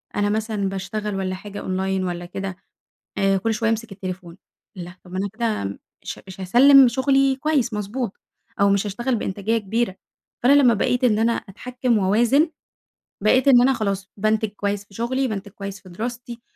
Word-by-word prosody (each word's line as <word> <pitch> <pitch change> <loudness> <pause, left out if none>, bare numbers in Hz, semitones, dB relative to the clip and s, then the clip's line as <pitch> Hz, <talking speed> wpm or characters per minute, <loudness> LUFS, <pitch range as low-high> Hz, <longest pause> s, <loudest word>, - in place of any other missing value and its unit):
أنا 205 0 +1
مثلًا 215 -2 -1
باشتغل 200 +2 -4
والّا 190 -1 -2
حاجة 205 +2 -8
أونلاين 190 0 -1
والّا 175 -1 -4
كده 190 +1 -6 0.6
آآ 195 0 +3
كل 225 +4 0
شويّة 225 0 0
أمسك 225 -1 -3
التليفون، 185 -3 -7 0.4
ألاه 175 0 -8
طب 180 - -14
ما 185 - -3
أنا 200 +1 -1
كده 220 - -2 0.3
ش - - -6
مش 190 0 -10
هاسلّم 260 +7 +7
شغلي 270 +2 +2
كويّس 285 -4 0
مضبوط، 210 +2 -4 0.4
أو 200 0 +5
مش 200 +1 +1
هاشتغل 240 +6 -2
بإنتاجية 210 +2 -1
كبيرة. 220 -1 -2 0.5
فأنا 250 +3 +5
لمّا 240 -3 +5
بقيت 250 +5 0
إن 215 -4 +3
أنا 230 +1 +3
أتحكّم 245 +3 -2
وأوازن 235 - +3 0.7
بقيت 255 +6 +3
إن 250 -3 +7
أنا 265 +2 +4
خلاص 200 -5 -3
بانتج 215 +1 +1
كويّس 205 0 -3
في 200 - -22
شغلي، 260 +5 -1
بانتج 200 -3 -5
كويّس 200 -1 -7
في 185 - -15
دراستي، 235 +5 -6
210 Hz, 175 wpm, -22 LUFS, 195-240 Hz, 0.7 s, هاسلّم